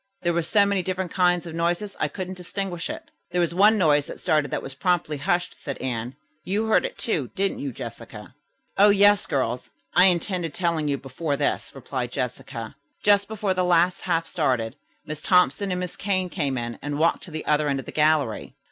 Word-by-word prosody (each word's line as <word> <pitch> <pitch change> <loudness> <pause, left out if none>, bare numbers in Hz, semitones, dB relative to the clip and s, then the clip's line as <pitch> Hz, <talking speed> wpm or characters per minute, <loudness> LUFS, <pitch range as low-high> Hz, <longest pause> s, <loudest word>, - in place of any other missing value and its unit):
"There 175 -1 +2
were 170 - +1
so 200 +5 +3
many 200 -1 +1
different 185 -1 -3
kinds 180 -1 +2
of 165 - -7
noises 175 +5 -1
I 155 - +1
couldn't 185 +4 -5
distinguish 180 -1 -4
it." - - -7 0.2
"There 180 - -1
was 170 -1 +1
one 210 +4 +5
noise 150 -6 +3
that - - -8
started 150 -2 +1
that - - -3
was 135 - -6
promptly 160 0 0
hushed," 175 +5 0
said 140 - -4
Anne. 125 -1 -4 0.3
"You 205 +4 -1
heard 220 - +3
it, - - -5
too, 155 - -1
didn't 195 0 0
you 140 - -3
Jessica?" - - -9 0.5
"Oh, 205 +1 +8
yes, 205 0 +5
girls, 125 -2 -1 0.2
I 180 +2 +7
intended 175 -2 0
telling 170 -4 0
you 140 -1 0
before 140 +3 -3
this," 145 0 -1
replied 130 -2 -4
Jessica. 125 -2 -5 0.3
"Just 205 -1 +4
before 210 -3 -1
the 185 0 0
last 180 0 +3
half 165 -2 0
started, 130 -10 -1 0.3
Miss 155 -1 -6
Thompson 185 +3 +3
and 180 -1 -1
Miss 180 -1 -4
Kane 185 -2 -1
came 145 -7 -1
in 120 -1 -4
and 145 0 -3
walked 165 +2 +2
to - - -11
the 155 -1 -5
other 150 0 +2
end 135 -1 0
of - - -7
the - - -7
gallery. 150 -7 +1
170 Hz, 205 wpm, -24 LUFS, 145-185 Hz, 0.5 s, Oh